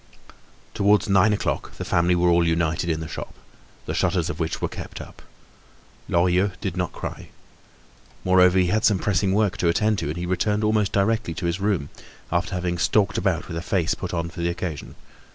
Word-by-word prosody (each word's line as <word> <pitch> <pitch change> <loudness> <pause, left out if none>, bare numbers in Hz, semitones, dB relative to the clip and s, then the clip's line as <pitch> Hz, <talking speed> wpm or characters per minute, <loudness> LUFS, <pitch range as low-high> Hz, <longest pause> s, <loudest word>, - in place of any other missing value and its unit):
Towards 100 -1 +3
nine 100 +1 +4
o'clock 105 - -2
the - - -6
family 85 +1 +2
were 90 0 +3
all 85 0 +4
united 85 +1 0
in 80 0 -1
the 80 - -5
shop, 75 - -7 0.5
the - - -3
shutters - - 0
of 80 - -9
which 80 -1 -2
were - - -1
kept - - -8
up. - - -11 0.9
Lorilleux 90 +3 +2
did 95 -4 -3
not 90 -2 -2
cry. - - -7 0.9
Moreover 90 0 +5
he 90 - +4
had 110 +3 +1
some 105 - +4
pressing 95 0 0
work 100 -1 +1
to 90 - 0
attend 105 +4 +1
to, - - -3
and 75 +3 -4
he 90 - -3
returned 105 +4 0
almost 105 -2 +2
directly 100 -3 0
to 90 - -4
his 85 +2 -1
room, 95 -8 0 0.4
after 85 +1 -1
having 90 -1 -2
stalked 100 +3 +2
about - - -1
with 85 - -5
a - - -3
face 90 -2 0
put 90 - -5
on 85 -1 -3
for 85 0 -7
the 85 - +1
occasion. 85 -4 -5
90 Hz, 200 wpm, -23 LUFS, 85-100 Hz, 0.9 s, Moreover